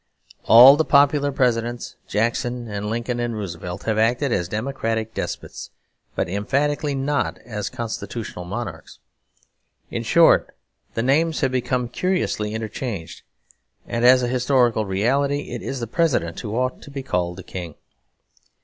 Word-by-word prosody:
All 125 +5 +9
the 160 - +3
popular 145 -1 +3
Presidents, 120 -2 -1
Jackson 120 +2 -1
and 105 0 -4
Lincoln 120 +2 -2
and 120 -2 -2
Roosevelt, 90 -2 -6
have 110 -1 0
acted 120 +5 +2
as 90 -6 0
democratic 110 0 -2
despots, - - -5 0.5
but - - 0
emphatically 140 - -1
not 135 - -1
as 105 -4 -4
constitutional 115 -4 -5
monarchs. 90 -3 -6 0.9
In - - -2
short, - - +4 0.4
the 115 - 0
names 155 +5 +2
have 135 -2 +1
become 125 -1 -1
curiously 125 - -1
interchanged; 110 -4 -5 0.6
and 115 0 -2
as 125 +1 +6
a - - +1
historical 125 -3 +2
reality 140 +9 0
it - - -5
is 135 - -4
the 120 - -3
President 120 - 0
who 110 -1 -5
ought 130 +1 -1
to - - -12
be 140 -1 -6
called 90 -7 -2
a 95 - -8
King. 85 -4 -7
120 Hz, 140 wpm, -22 LUFS, 105-135 Hz, 0.9 s, All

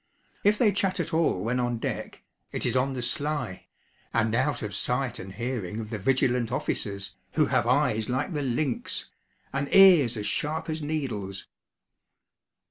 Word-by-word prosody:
If 205 +1 +4
they 220 -3 +4
chat 195 -2 0
at - - -2
all 160 - +2
when 120 +3 0
on 120 -1 0
deck, - - -5 0.3
it - - -3
is - - +1
'on 130 +1 +1
the 125 - -3
sly,' 145 - -2 0.4
and 110 -1 +1
out 115 - +1
of 105 -1 -4
sight 125 -1 -1
and 95 - -7
hearing 110 -2 -3
of 110 0 -6
the 110 - -3
vigilant 125 +1 +1
officers, 100 -5 -3 0.2
who - - +4
have - - +1
eyes 110 +1 +2
like 135 +8 -1
the 150 - -1
lynx, 130 0 -1 0.4
and 140 +1 -2
ears 175 - +7
as 105 - -3
sharp 155 +6 -1
as 155 0 -3
needles. 120 -11 -3
125 Hz, 165 wpm, -27 LUFS, 110-150 Hz, 0.4 s, ears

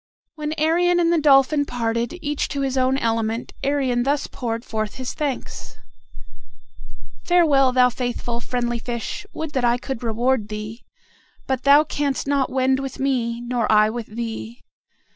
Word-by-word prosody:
When 300 0 -4
Arion 340 +3 +2
and 340 0 +3
the 330 - +2
dolphin 285 0 +5
parted, 235 +3 -2
each 295 0 -1
to 280 - -3
his 270 -1 -1
own 260 0 +2
element, 225 -2 -1
Arion 270 -3 +1
thus 280 +3 0
poured 230 -1 -4
forth 215 -1 -3
his 255 -1 -5
thanks: 290 -4 -5 1.5
"Farewell, 300 -7 +4
thou 250 0 +4
faithful, 240 -1 -3
friendly 240 -1 -2
fish! 235 0 -5
Would 315 -1 -5
that 260 -4 -1
I 240 0 +3
could 255 -1 -5
reward 235 0 0
thee; 215 +2 -6 0.6
but 260 -1 -2
thou 285 +2 +7
canst 285 -3 -2
not 275 -1 +1
wend 265 0 +2
with 270 -1 -5
me, 240 -4 0
nor 240 -2 -1
I 215 0 +5
with 235 -1 -5
thee. 230 +1 -6
255 Hz, 155 wpm, -22 LUFS, 235-280 Hz, 1.5 s, thou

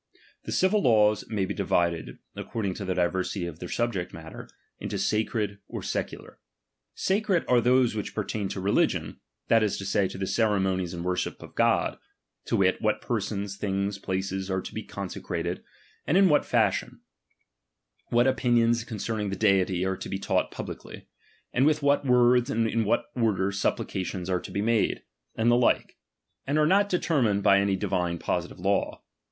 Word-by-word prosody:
The - - -5
civil 200 +3 +2
laws 105 -4 +3
may 105 -4 0
be - - -3
divided, 85 -2 0 0.2
according 100 -5 -3
to 100 - -6
the 95 -1 -1
diversity 90 +1 -1
of 85 -2 -7
their 90 - -7
subject 115 -7 -1
matter, 80 0 -10 0.3
mto - - -3
sacred 105 -1 -1
or - - -6
secular. - - -5 0.6
Sacred 195 -2 +1
are 125 -1 +4
those 125 0 +3
which 105 -2 -5
pertain 105 -1 -2
to - - -4
religion, 100 +2 0 0.3
that 115 - +4
is 105 -2 0
to 95 - -6
say, 100 0 +1
to - - -8
the 95 - -2
ceremo 100 -3 +1
nies 90 -1 -5
and 85 0 -5
worship 90 0 -2
of - - -12
God: - - +1 0.5
to - - 0
wit, 95 -1 +2
what 110 - +1
persons, 100 -3 -3
things, 100 0 -2
places, 95 0 -3
are 95 0 0
to - - -8
be - - -4
consecrated, - - -5 0.4
and 175 - +3
in 195 -1 +6
what 150 - +3
fashion; - - 0 1.1
what 120 +1 +3
opiuions 120 -3 +2
concerning 110 -2 -3
the 100 - -3
Deity 95 -3 +2
are 95 0 -1
to - - -7
be 95 - -2
taught 100 - 0
publicly; - - -8 0.4
and 130 - +3
with 155 -1 +1
what 140 0 +3
words 125 0 +4
and 115 0 +1
in 115 0 0
what 105 - +1
order 105 -5 +1
supplications 95 -2 -2
are 90 - +1
to - - -9
be 100 - -2
made; 115 0 +1 0.3
and 115 +1 +2
the - - +5
like; 120 0 +2 0.5
and 145 +2 +1
are 155 - +4
not 200 +5 +3
determined 130 - +1
by 100 -1 +6
any 100 -1 +1
divine 90 -3 -1
positive - - -3
law. - - -1
105 Hz, 175 wpm, -27 LUFS, 95-120 Hz, 1.1 s, in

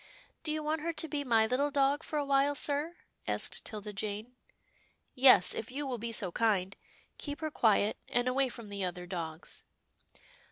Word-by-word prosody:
" - - -34
Do 310 - -1
you 310 0 -2
want 305 +1 -1
her 335 +1 -2
to 310 +1 -2
be 295 -2 -2
my 225 -4 +4
little 255 +5 +1
dog 280 +1 +2
for 310 - -4
a 290 - 0
while, 280 +1 +3
sir? 295 +4 0 0.2
" - - -35
asked - - -1
'Tilda 210 -1 -6
Jane. 210 +4 -5 0.4
" - - -35 0.2
Yes, 255 -8 +7
if 225 - -5
you 285 +3 -3
will 250 -3 -3
be 230 +1 -3
so 195 -5 -1
kind. 200 -3 +1 0.4
Keep 290 0 -5
her 310 -1 -2
quiet, 215 -5 +3
and 245 +1 +1
away 265 +1 +2
from 235 -3 -9
the 200 -1 -4
other 180 -1 -4
dogs." 165 -3 -6
250 Hz, 200 wpm, -31 LUFS, 210-290 Hz, 0.4 s, Yes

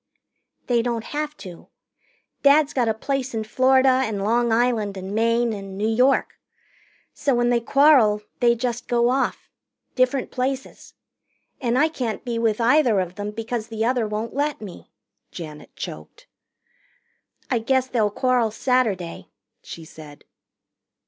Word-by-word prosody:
"They 240 -2 +2
don't 230 -1 -2
have 300 +2 -4
to. 175 -2 -11 0.7
Dad's 285 +1 +4
got 245 -3 +1
a - - +2
place 270 +1 -3
in 220 - -1
Florida 260 +3 +3
and 210 -5 -3
Long 235 +2 +1
Island 225 -4 +1
and 190 +1 -6
Maine 230 +1 +1
and 195 -2 -7
New 210 +2 0
York. 250 +5 +2 0.7
So 275 -3 0
when 240 0 +2
they 240 - +3
quarrel, 235 -5 +4 0.2
they 235 -1 +4
just 240 0 -3
go 240 0 +2
off. 270 +1 -1 0.5
Different 255 +1 0
places. 265 +1 -4 0.7
And 245 -1 0
I 300 +4 +4
can't 250 -8 -4
be 235 -2 -2
with 225 -1 +1
either 240 -3 +3
of 180 -1 -3
them 205 +2 -5
because 225 +1 -4
the 225 -1 -2
other 245 -2 +1
won't 215 +2 -4
let 290 +2 -1
me," 200 -5 -10 0.4
Janet 155 -3 -10
choked. - - -9 1.3
"I 245 - +2
guess 260 +3 +1
they'll 230 -5 0
quarrel 245 +1 +1
Saturday," 215 -7 -1 0.3
she 165 - -10
said. 150 -2 -13
235 Hz, 145 wpm, -23 LUFS, 215-255 Hz, 1.3 s, Dad's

